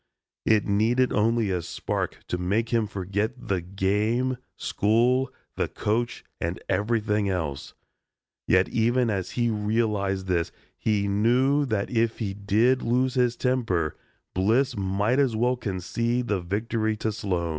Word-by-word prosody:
It 110 -2 +4
needed 115 +5 +2
only 110 -1 +2
a 90 -2 0
spark - - -3
to 90 - -1
make 105 +6 0
him 115 -3 +1
forget 100 +3 -2 0.2
the 95 -3 +1
game, 105 +8 0 0.2
school, 120 +5 +2 0.3
the - - +1
coach 120 +3 -2 0.2
and 85 +2 -2
everything 105 -1 +1
else. 80 -7 -3 0.7
Yet 95 +1 +4
even 120 +1 +2
as 95 -3 -2
he 120 -1 +2
realized 105 -3 0
this 85 -3 0 0.2
he 105 -2 0
knew 125 +8 +3
that 110 -4 -1
if 115 -1 +1
he 100 -4 -3
did 110 +6 +2
lose 125 +2 +1
his 125 -2 +2
temper, 115 - 0 0.4
Bliss 120 +8 +2
might 100 +5 +1
as 130 -5 +2
well 125 +3 +2
concede 115 +3 -2
the 100 -3 +1
victory 110 +4 -1
to 110 0 -1
Sloan. 90 -5 -2
110 Hz, 140 wpm, -26 LUFS, 100-120 Hz, 0.7 s, It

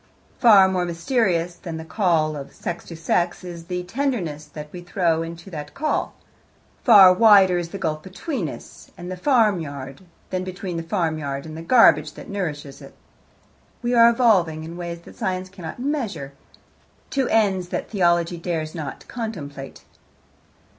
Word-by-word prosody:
Far 205 -6 +7
more 185 -1 0
mysterious 175 0 0
than 170 -2 -7
the 160 - -7
call 160 -5 +1
of 140 -2 -9
sex 170 - -5
to 165 - -9
sex 175 +2 -1
is 170 -2 -8
the 180 0 -3
tenderness 180 - -2
that 150 0 -9
we 180 - -8
throw 175 -2 0
into 170 +3 -8
that 150 -2 -7
call; 305 +1 -1 0.7
far 195 -6 +9
wider 190 -3 +6
is 170 -1 -5
the 195 - -6
gulf 155 -5 -2
between 190 - -4
us - - -12
and 175 +1 -7
the - - -3
farmyard 175 - 0 0.3
than 185 0 -1
between 185 -1 -5
the - - -2
farm 165 -2 -1
yard 140 -1 -4
and 155 -1 -8
the 165 - -7
garbage 160 - +5
that - - -11
nourishes 150 -8 -5
it. - - -13 0.9
We 240 +1 0
are 235 -1 +7
evolving, 190 -10 +2
in 165 +2 -8
ways 170 -1 -6
that - - -15
Science 185 0 -2
cannot 180 -4 -8
measure, 240 - -3 0.8
to 270 -2 0
ends 195 -5 +2
that - - -4
Theology 175 -3 +2
dares 165 -2 -3
not 155 -5 -7
contemplate. 150 - -7
175 Hz, 160 wpm, -23 LUFS, 160-195 Hz, 0.9 s, far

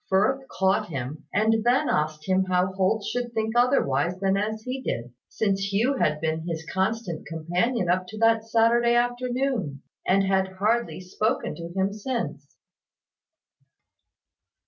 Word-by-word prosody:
Firth 260 +8 +2
caught 190 -4 +1
him; 140 +1 -5
and 220 +2 +2
then 255 +5 +3
asked 155 0 -1
him 190 0 +2
how 185 0 +1
Holt 195 +3 +1
should 245 +2 -3
think 220 +1 -1
otherwise 185 - +2
than 195 0 +2
as 215 +2 -2
he 255 +2 -4
did, 120 - -4 0.2
since 200 -2 -1
Hugh 240 +7 +2
had 150 -8 +1
been 160 0 -1
his 160 -1 -4
constant 190 -3 -2
companion 175 +7 -1
up 180 +1 +1
to 215 - -9
that 225 0 +3
Saturday 235 +1 +3
afternoon, 245 - -1 0.2
and 195 +1 +4
had 190 -1 +1
hardly 215 +2 0
spoken 215 +6 -1
to 170 0 -8
him 195 +1 +1
since. 210 - -4
195 Hz, 145 wpm, -25 LUFS, 180-235 Hz, 0.2 s, and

